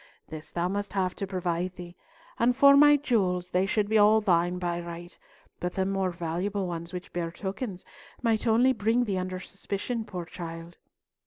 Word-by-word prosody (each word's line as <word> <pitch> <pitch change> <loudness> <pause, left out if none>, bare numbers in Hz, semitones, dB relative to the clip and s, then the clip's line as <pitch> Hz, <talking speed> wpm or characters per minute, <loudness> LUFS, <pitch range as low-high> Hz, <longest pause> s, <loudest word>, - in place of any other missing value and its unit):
This 155 -1 -8
thou 175 0 -1
must 200 +2 -3
have 185 -2 0
to 195 - -3
provide 180 -1 -2
thee. 175 -1 -10 0.4
And 245 +1 +3
for 280 +1 +7
my 295 +1 +7
jewels, 185 -10 0
they 185 +2 +2
should 205 +1 +1
be 220 +1 +3
all 210 +1 +6
thine 175 -3 +2
by 175 -1 -2
right, 170 0 -8 0.4
but 180 0 -3
the 190 -1 0
more 195 -1 0
valuable 180 +4 -2
ones, 170 -1 -5
which 180 0 -8
bear 170 -1 -2
tokens, 195 +1 -5 0.3
might 230 -1 0
only 240 +4 +4
bring 230 +2 +1
thee 200 -5 -1
under 185 0 -4
suspicion, 200 +5 -4
poor 180 -5 -6
child." 165 0 -8
185 Hz, 180 wpm, -28 LUFS, 175-215 Hz, 0.4 s, for